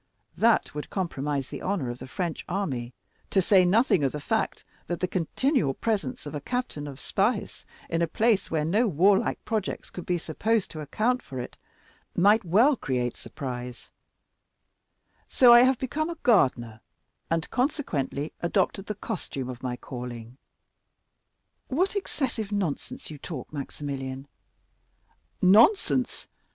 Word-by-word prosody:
That 230 0 +3
would 150 0 -6
compromise 145 -7 -2
the - - -7
honor 180 -11 -1
of 120 - -8
the 130 - -8
French 170 +3 -3
army, 140 -11 -2 0.4
to 195 - +3
say 190 0 +5
nothing 195 - +3
of 135 - +1
the 150 - -3
fact 220 +9 -1 0.2
that 175 - -2
the 185 - 0
continual 180 - 0
presence 200 - -2
of 145 - -6
a 145 - -4
captain 245 - -3
of 140 -1 -8
Spahis 205 +7 -1 0.2
in 165 0 -1
a 170 - +2
place 215 +3 +2
where 155 -2 0
no 210 +9 +2
warlike 190 +3 +2
projects 215 -4 -3
could 180 - -8
be 180 - +1
supposed 210 +6 -1
to 155 - -6
account 235 - 0
for 130 - -7
it 125 - -6 0.6
might 210 +5 +5
well 220 - +4
create 125 - -2
surprise; 125 -3 -7 1.4
so 245 -2 +7
I 240 - +9
have 260 0 +4
become 300 +6 -2
a 340 - -5
gardener, 120 - +2 0.5
and, 165 0 0
consequently, 165 - -1
adopted 190 +2 0
the 210 - -3
costume 160 - -4
of 125 -1 -7
my 125 -1 -3
calling." 120 -2 -8 1.3
"What 365 +10 0
excessive 255 - -2
nonsense 190 -6 -3
you 150 - -9
talk, 145 -2 -7
Maximilian!" 135 -1 -5 1.2
"Nonsense? 225 - +4
175 Hz, 140 wpm, -27 LUFS, 135-220 Hz, 1.4 s, I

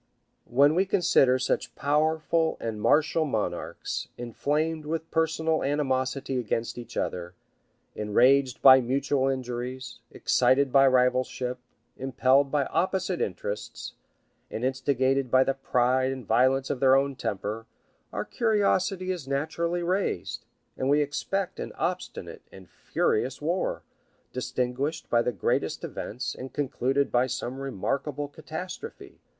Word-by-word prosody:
739] 120 - -13
When - - -1
we 190 +2 +3
consider 150 -9 +4
such 130 0 -2
powerful 160 +2 +1
and 110 -2 -4
martial 150 +7 +3
monarchs, 115 -9 -3
inflamed 150 +6 -2
with 160 +1 -3
personal 160 0 +1
animosity 135 -1 -1
against 115 0 -2
each 120 - -9
other, 90 0 -3 0.6
enraged 125 +5 +3
by 130 -1 +9
mutual 135 +2 0
injuries, 130 0 -4
excited 135 0 +2
by 135 0 +6
rivalship, 125 0 +1 0.4
impelled 135 +1 +2
by 145 -2 +2
opposite 185 +2 -1
interests, 100 +2 -4 0.6
and 115 - -3
instigated 130 0 +1
by 130 +2 +5
the 135 - 0
pride 130 0 +1
and 130 -3 -6
violence 130 +5 +2
of 130 - -3
their 130 0 +5
own 135 0 +1
temper, 110 -1 -4 0.4
our - - -3
curiosity 195 -4 +1
is 170 -7 -5
naturally 160 +5 -1
raised, 180 - -2 0.3
and 130 - -1
we 145 +1 +4
expect 175 +6 -2
an - - -5
obstinate - - -4
and - - -13
furious 445 -2 -1
war, - - -1 0.5
distinguished 125 +5 -2
by 120 - +4
the 125 - 0
greatest 100 -7 -1
events, 125 +3 -4
and 130 +1 -9
concluded 135 -1 0
by 125 +1 +3
some 130 +1 -4
remarkable 135 +3 -3
catastrophe. 175 - -8
135 Hz, 125 wpm, -27 LUFS, 125-155 Hz, 0.6 s, by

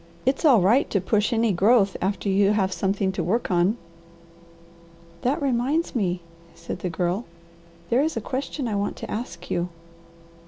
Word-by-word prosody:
It's 265 +5 +1
all 255 -9 +6
right 230 +10 +3
to 200 - +1
push 205 +3 +1
any 230 -1 +2
growth 200 +2 +3
after 200 +2 -1
you 200 +1 +3
have 190 -3 +1
something 195 0 0
to 190 -2 -3
work 205 +6 0
on." 180 +5 +2 1.4
"That 260 +4 +1
reminds 275 +4 0
me," 180 -6 0 0.3
said 170 +2 -6
the 180 - -3
Girl, 175 +6 -1 0.7
"there 245 +3 +4
is 315 -3 -1
a - - +1
question 260 +3 -3
I 220 - -2
want 200 0 -1
to - - -7
ask 195 -6 -6
you." 175 +1 0
205 Hz, 165 wpm, -24 LUFS, 190-245 Hz, 1.4 s, all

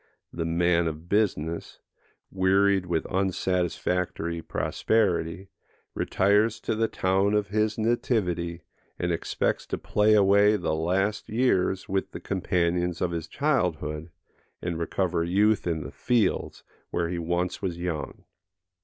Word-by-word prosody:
The 85 - -3
man 85 0 +2
of 80 +1 -6
business, 85 -6 -1 0.5
wearied 95 0 +3
with 85 -2 -1
unsatisfactory 90 -2 -1
prosperity, 95 -3 0 0.4
retires 105 +4 +2
to - - -1
the 110 +1 +1
town 95 +2 +1
of 105 -2 0
his 110 +1 0
nativity, 90 -7 0 0.3
and 85 - -1
expects 85 - -1
to - - -2
play 105 +1 +3
away 100 +1 +5
the 90 -5 -1
last 95 +6 0
years 100 -5 +1
with 95 0 -2
the - - -5
companions 90 -2 0
of 90 - 0
his 85 -1 -4
childhood, 80 - -1 0.5
and 85 -2 -3
recover 85 0 0
youth 100 +4 +2
in 80 -3 -1
the - - -8
fields, 120 -6 0 0.3
where 85 -1 -1
he 85 0 -3
once 85 +2 -1
was 90 -4 -2
young. 85 -3 -4
90 Hz, 125 wpm, -26 LUFS, 85-100 Hz, 0.5 s, away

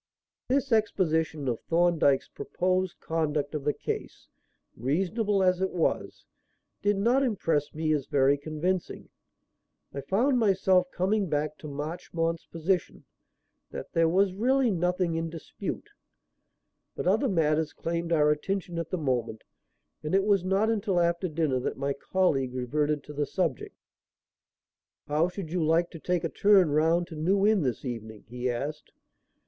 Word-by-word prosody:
This 270 +1 0
exposition 160 -9 +1
of 120 -2 -1
Thorndyke's 165 -5 +3
proposed 185 0 -2
conduct 155 -3 -1
of 150 -2 -3
the 150 - +3
case, - - -6 0.5
reasonable 195 - 0
as 185 0 +2
it 190 - +1
was, 170 -3 -2 0.6
did 205 0 +2
not 240 +7 +3
impress 165 - 0
me 155 0 +1
as 145 -3 -1
very 140 0 +3
convincing. 155 +5 -3 0.8
I 140 - -4
found 245 - +2
myself 190 -4 +3
coming 195 +1 0
back 150 0 -1
to 155 - -8
Marchmont's 165 +3 -3
position, 170 +2 -2 0.7
that - - -8
there 165 -1 +3
was 190 +2 +2
really 250 +4 +2
nothing 180 -1 0
in 165 0 -2
dispute. 165 -1 -6 1.0
But - - -4
other 220 +9 +2
matters 155 -4 +1
claimed 170 0 -3
our 150 -2 +4
attention 175 +2 -2
at 165 -1 -4
the 185 - -2
moment, 125 -7 -2 0.6
and 155 +4 -1
it 195 - +4
was 200 -3 +2
not 195 +3 +2
until 200 -4 0
after 170 +2 +1
dinner 155 -5 0
that 125 - -3
my 140 +1 -1
colleague 135 -6 0
reverted 145 +4 -1
to 150 - -10
the 145 0 -1
subject. 165 -5 -2 1.3
"How 150 +3 +2
should 180 -3 -7
you 175 -2 0
like 165 +2 +2
to 165 - -9
take 180 +1 -1
a - - -1
turn 195 -6 +4
round 165 +3 +2
to 160 - -8
New 190 +6 +2
Inn 215 -2 +4
this 130 -2 -2
evening?" 110 -3 -6
he 125 +2 -3
asked. 145 +5 -4
165 Hz, 150 wpm, -28 LUFS, 150-190 Hz, 1.3 s, our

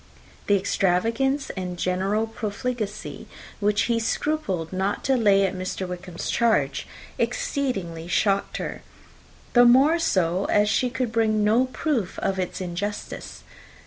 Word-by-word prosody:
The 205 - +5
extravagance 225 +9 +1
and 180 -2 -5
general 190 +5 0
profligacy 220 -1 -4 0.3
which 205 +1 +2
he 235 -1 +1
scrupled 215 - -1
not 190 +2 -1
to 270 - +2
lay 200 -5 +4
to 190 - 0
Mr. 185 0 -4
Wickham's 180 -1 -5
charge 220 -13 +1 0.3
exceedingly 215 -9 -2
shocked 195 +3 +1
her; - - -5 0.7
the 245 - +7
more 270 +7 +6
so, 185 - +1
as 210 0 +3
she 250 - +2
could 250 -2 -2
bring 220 -2 +2
no 225 +5 +4
proof 255 - -2
of 190 -1 -1
its 185 +1 -3
injustice. 190 +4 -5
205 Hz, 130 wpm, -24 LUFS, 185-240 Hz, 0.7 s, the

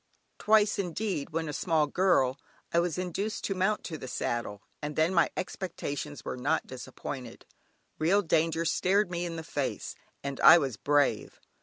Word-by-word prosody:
Twice 215 -1 +3
indeed, 185 -4 -2
when 160 0 -2
a 150 - -4
small 160 -1 +2
girl, 145 -5 +2 0.3
I 170 - +4
was 170 -1 -1
induced 190 +4 -3
to 195 - -1
mount 195 +3 0
to 160 -4 -6
the - - -7
saddle, 115 -5 -3 0.2
and 150 0 -4
then 160 +4 +2
my 170 - +4
expectations 150 - -5
were - - -3
not 145 +6 0
disappointed. 130 -1 -8 0.5
Real 190 +6 +3
danger 165 0 +1
stared 190 +3 +2
me 175 0 -2
in 165 - -5
the 160 - -5
face, - - -3 0.3
and 140 -1 -4
I - - +9
was 135 -8 -1
brave. 145 +5 +1
165 Hz, 165 wpm, -29 LUFS, 145-185 Hz, 0.5 s, I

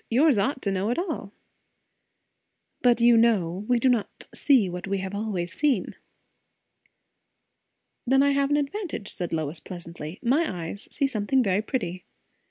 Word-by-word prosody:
"Yours 275 +4 +4
ought 245 +6 0
to 200 - 0
know 195 +2 -1
it 240 - 0
all." 325 - -3 1.5
"But 245 -2 +4
you 235 0 +6
know, 205 -5 +2
we 245 - +3
do 235 - +2
not 240 -5 0
see 260 -9 +4
what 180 +1 -6
we 195 0 0
have 190 0 -5
always 200 -4 -3
seen." 260 -4 0 2.1
"Then 270 +2 +4
I 280 - +3
have 280 0 +1
an 290 - +3
advantage," 295 - -3
said 175 -2 -3
Lois 155 0 -1
pleasantly. 170 -2 -8
"My 235 - 0
eyes 200 - -9
see 280 - 0
something 255 +1 +1
very 195 -1 +1
pretty." 185 -6 -3
215 Hz, 155 wpm, -26 LUFS, 185-265 Hz, 2.1 s, you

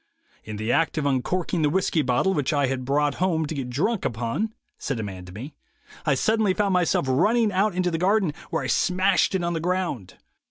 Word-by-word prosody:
'In 110 -1 -7
the 110 +3 -1
act 165 +2 +1
of 150 - 0
uncorking 165 +6 0
the 150 - +3
whiskey 175 -1 +1
bottle 135 +9 +1
which 145 -6 0
I 145 -2 +2
had 130 -1 -3
brought 145 +2 +1
home 165 -4 +1
to 150 - -4
get 135 -4 -4
drunk 180 - 0
upon,' 120 - -2 0.3
said 135 -4 -3
a - - -2
man 95 -3 -7
to 90 - -11
me, 125 +10 -8 0.5
'I 140 - +4
suddenly 215 +4 +2
found 200 -2 +1
myself 180 -5 +2
running 215 - +3
out 195 0 +1
into 180 -1 0
the 165 - -2
garden, 190 -3 +2 0.2
where - - -1
I - - -3
smashed 190 +1 +2
it 185 - 0
on 170 0 -1
the 165 - -1
ground. 175 - -2
160 Hz, 215 wpm, -24 LUFS, 130-185 Hz, 0.5 s, I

